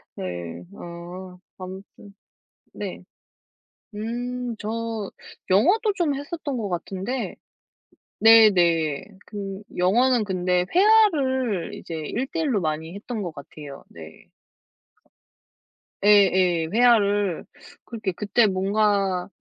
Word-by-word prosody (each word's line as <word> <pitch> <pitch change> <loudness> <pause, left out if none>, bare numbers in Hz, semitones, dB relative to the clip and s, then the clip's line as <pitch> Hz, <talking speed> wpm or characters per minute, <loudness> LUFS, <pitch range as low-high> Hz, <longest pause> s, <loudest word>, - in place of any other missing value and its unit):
네 85 -1 -6
아. 175 +2 -9 0.2
아무튼 190 +2 -11 0.6
네. - - -6 0.9
음, 240 +2 -4
저 225 -1 -4 0.4
영어도 370 - +4
좀 335 -7 0
했었던 290 -1 -5
것 215 -4 -3
같은데 195 +8 -4 0.8
네네. 175 -9 +5 0.2
근 200 -1 -6
영어는 235 +6 +3
근데 180 -2 0
회화를 285 - +3
이제 165 - -8
1 210 - -3
대 330 - -2
1로 265 -11 +1
많이 160 +2 -3
했던 215 +1 -5
것 175 -3 -4
같아요. 140 0 -10
네. - - -13 1.8
예예. 185 -5 +4
회화를 205 -6 +3 0.4
그렇게 215 -5 -4
그때 210 +5 +2
뭔가 195 -1 +1
205 Hz, 170 characters per minute, -24 LUFS, 180-240 Hz, 1.8 s, 네네